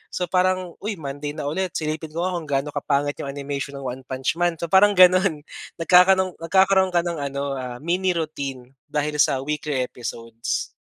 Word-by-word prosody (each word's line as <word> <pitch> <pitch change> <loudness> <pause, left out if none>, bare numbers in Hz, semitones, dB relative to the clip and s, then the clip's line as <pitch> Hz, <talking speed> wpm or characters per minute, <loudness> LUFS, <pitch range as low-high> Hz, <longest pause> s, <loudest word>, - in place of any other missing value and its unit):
So 180 - 0
parang, 185 -1 +1
"Uy! 210 +1 -3
Monday 145 -2 -5
na 150 - -5
ulit 185 +3 -2
silipin 155 0 -3
ko 170 +2 -2
nga 185 - 0
kung 165 -3 -5
gaano 140 0 -1
kapangit 145 0 -1
'yong - - -4
animation 140 0 -5
ng 140 - -8
One 130 +1 -6
Punch 130 +4 -2
Man", 175 -1 +2
so, 170 - -3
parang 205 +2 +6
gano'n. 185 -3 +5 0.4
Nagkakaroon 185 +2 +5
nagkakaroon 190 +2 +4
ka 175 - +4
ng 170 -2 -3
ano, 140 0 -3
ah, 125 -1 -5
mini 180 +2 +1
routine 140 -6 -4 0.2
dahil 150 0 -2
sa 135 -2 +3
weekly 150 -3 -2
episodes. 115 -2 -4
155 Hz, 185 wpm, -23 LUFS, 140-180 Hz, 0.4 s, parang